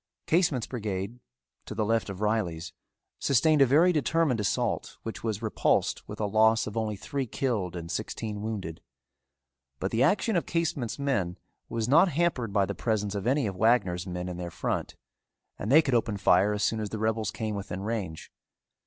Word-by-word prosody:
Casement's 160 -8 +2
brigade, 105 -1 -4 0.5
to 110 - -6
the 110 0 0
left 115 -1 +1
of 100 0 -6
Reilly's, 90 -6 -1 0.5
sustained 150 +3 +3
a 135 - +7
very 160 +8 +5
determined 155 -5 +1
assault 100 -5 -1
which 115 - -6
was 110 -1 -2
repulsed 110 - 0
with - - -7
a 105 - 0
loss 110 +2 +4
of 105 - -6
only 110 -2 -1
three 135 +5 -3
killed 105 -8 -2
and 85 -1 -6
sixteen 105 -2 -4
wounded. 95 -7 -5 1.0
But 95 - -3
the 115 - +1
action 200 - +3
of 170 - 0
Casement's 150 -8 -1
men 105 -12 -1 0.3
was 115 -1 -2
not 160 +8 +6
hampered 150 -8 0
by 100 -1 +3
the - - -3
presence 105 -3 -1
of 100 +2 -3
any 135 +1 +2
of 100 -3 -3
Wagner's 95 -4 +2
men 90 0 -4
in 90 -1 -5
their 90 -1 -4
front - - -3 0.6
and 105 - -2
they 155 +3 +7
could 135 - -1
open 110 -3 +1
fire 95 +1 +4
as 105 0 -1
soon 110 +1 +1
as 105 -1 -3
the 110 - -4
rebels 110 -1 0
came 110 0 -3
within 100 -2 -5
range. 100 -8 -4
110 Hz, 185 wpm, -28 LUFS, 100-125 Hz, 1.0 s, a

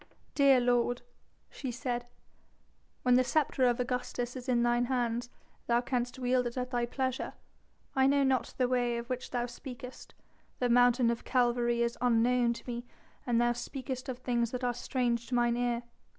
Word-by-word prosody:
"Dear 275 -2 +5
lord," 245 0 +1 0.5
she 270 - -5
said, 245 -1 -3 1.0
"when 250 - +4
the 255 +1 +5
sceptre 265 -2 +2
of 240 0 +1
Augustus 250 0 -2
is 255 0 -6
in 240 -1 +3
thine 240 0 +2
hands 240 -1 -1 0.4
thou 235 0 +3
canst 245 0 -2
wield 250 -1 +1
it 240 - -7
at 250 0 -3
thy 240 -1 0
pleasure. 260 0 -2 0.6
I 265 0 +4
know 280 0 +3
not 265 -2 0
the 255 - +2
way 245 -1 +1
of 235 0 -5
which 255 0 -3
thou 245 -1 -1
speakest; 250 0 -9 0.4
the 245 - 0
mountain 245 0 +5
of 235 - -4
Calvary 240 -1 +2
is 235 0 -2
unknown 240 0 +3
to - - -10
me 240 -1 -4 0.4
and 235 -1 +3
thou 240 0 +3
speakest 260 +1 -5
of 250 - -3
things 240 -2 0
that 250 +1 -5
are 245 -1 +1
strange 240 -1 -1
to 250 - -2
mine 240 -1 +3
ear.... 240 -1 0
245 Hz, 180 wpm, -31 LUFS, 240-255 Hz, 1.0 s, Dear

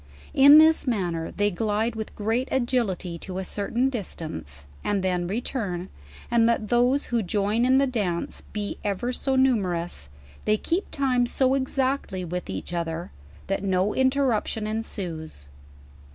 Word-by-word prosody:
In 285 +2 +9
this 315 -2 +5
manner 175 -8 -1
they 205 +1 0
glide 215 +4 0
with 220 -1 -6
great 225 +5 0
agility 230 -9 0
to 185 +1 -6
a 190 - -3
certain 230 +7 0
distance, 160 - -6 0.2
and 200 -2 0
then 180 -2 0
return: 195 -4 -3 0.4
and 230 -1 +4
let 225 -3 0
those 245 +4 +3
who 235 - +3
join 210 +4 +1
in 260 +1 +5
the 275 - +4
d:m:e 205 -10 -2
be 205 -1 -4
ever 210 +5 -1
so 265 +1 0
numerous, 180 - +1 0.4
they 215 0 +3
keep 345 - -1
time 255 -3 +1
so 260 +1 +2
exactly 265 -7 -1
with 180 - -4
each 95 - -5
other, 170 0 -3 0.3
that 195 0 -2
no 190 +1 +1
interruption 260 -5 +1
ensues. 180 - -5
210 Hz, 145 wpm, -25 LUFS, 180-255 Hz, 0.4 s, In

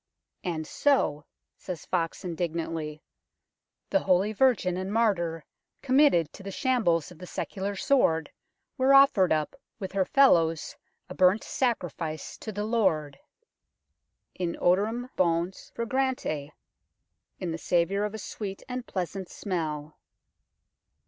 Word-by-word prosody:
" - - -54
And 155 -1 -4
so," 150 - +1 0.3
says 180 -4 -7
Foxe 170 +1 -2
indignantly, 165 -3 -3 0.4
" - - -59
the 290 - +4
holy 195 +1 +2
virgin 220 -6 +3
and 190 +1 -3
martyr, 175 -8 +1 0.4
committed 260 - +4
to - - -11
the 195 - -6
shambles 195 - +1
of 175 - -14
the 180 - -9
secular 200 +2 -4
sword, 190 -9 +2 0.5
was 260 +1 +3
offered 275 -10 +6
up 155 - 0 0.2
with 190 -4 -5
her 195 -1 +2
fellows 170 - +3 0.3
a 185 - -7
burnt 185 +3 +4
sacrifice 175 - -2
to 220 - -6
the 205 0 -3
Lord, 190 -10 0 1.1
in 175 -2 -3
odor 185 +4 +3
em 245 +3 -5
"bonce 170 +1 0
fragrantia 235 - -1 0.3
" - - -53
(" - - -53
in 175 - -3
the 165 - -4
savour 180 +5 +1
of 210 +1 -3
a - - -4
sweet 200 -2 -6
and 250 -1 -5
pleasant 185 0 -4
smell 155 -6 -4
185 Hz, 135 wpm, -28 LUFS, 165-225 Hz, 1.1 s, offered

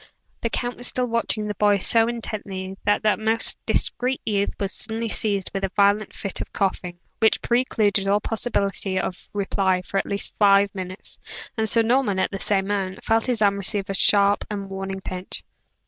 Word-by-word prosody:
The 230 - 0
count 245 +1 -3
was 245 - +3
still 250 - +3
watching 230 -2 -1
the 210 - -2
boy 205 0 +3
so 225 +4 +4
intently, 200 -5 -4
that 205 +1 +2
that 215 -1 +2
most 220 +1 +1
discreet 255 +2 +1
youth 200 -2 0
was 195 -1 -1
suddenly 225 +1 -2
seized 200 -3 -1
with 195 0 -3
a 195 - 0
violent 205 +1 +2
fit 195 - -4
of - - -7
coughing, 185 -3 -2 0.2
which 220 -1 +3
precluded 215 -5 +1
all 200 +1 +3
possibility 200 -4 -1
of 185 - -5
reply 190 -2 0
for 195 - -1
at - - -3
least 200 0 -4
five 200 -1 +5
minutes; 185 0 -7 0.4
and 220 -2 0
Sir 230 +1 +4
Norman, 235 -4 +2
at 190 - 0
the 195 - -4
same 195 -1 +1
moment, 195 -2 -2
felt 225 +2 +1
his 235 -4 +1
arm 200 -1 +3
receive 200 0 0
a - - -2
sharp 200 +1 +3
and 200 -2 -5
warning 195 0 -5
pinch. 185 0 -6
205 Hz, 190 wpm, -23 LUFS, 195-220 Hz, 0.4 s, five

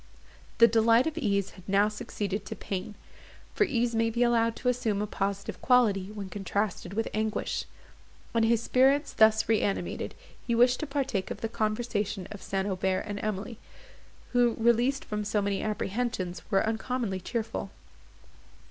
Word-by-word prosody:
The 230 - +8
delight 230 +1 +4
of 320 -1 -2
ease 200 - 0
had 185 0 -14
now 200 +1 +4
succeeded 210 -1 -4
to - - -5
pain; 195 +2 -5 0.6
for 420 - +3
ease 240 -6 0
may 225 0 +2
be 235 +2 +1
allowed 230 -1 +2
to - - -5
assume 230 -5 +1
a 210 - 0
positive 200 -1 -3
quality 220 -7 +3
when 205 -2 -6
contrasted 195 -1 -3
with 225 +1 0
anguish; 215 0 -1 0.7
and, 230 -1 +3
his 230 0 +3
spirits 275 +4 +3
thus 220 0 +4
reanimated, 210 -3 -1 0.3
he 235 - +1
wished 245 +2 +4
to 310 - -3
partake 270 -9 -1
of 205 - -6
the 225 - -2
conversation 215 -3 -2
of 205 -3 -8
St. 195 +1 -2
Aubert 190 -1 0
and 205 -1 -4
Emily, 215 +2 -4 0.7
who, 245 -2 +3
released 235 +4 +2
from 210 0 -3
so 210 +1 0
many 200 -1 -1
apprehensions, 205 -4 -2
were 195 -1 +2
uncommonly 220 -2 -2
cheerful. 220 +4 -3
220 Hz, 155 wpm, -28 LUFS, 200-235 Hz, 0.7 s, The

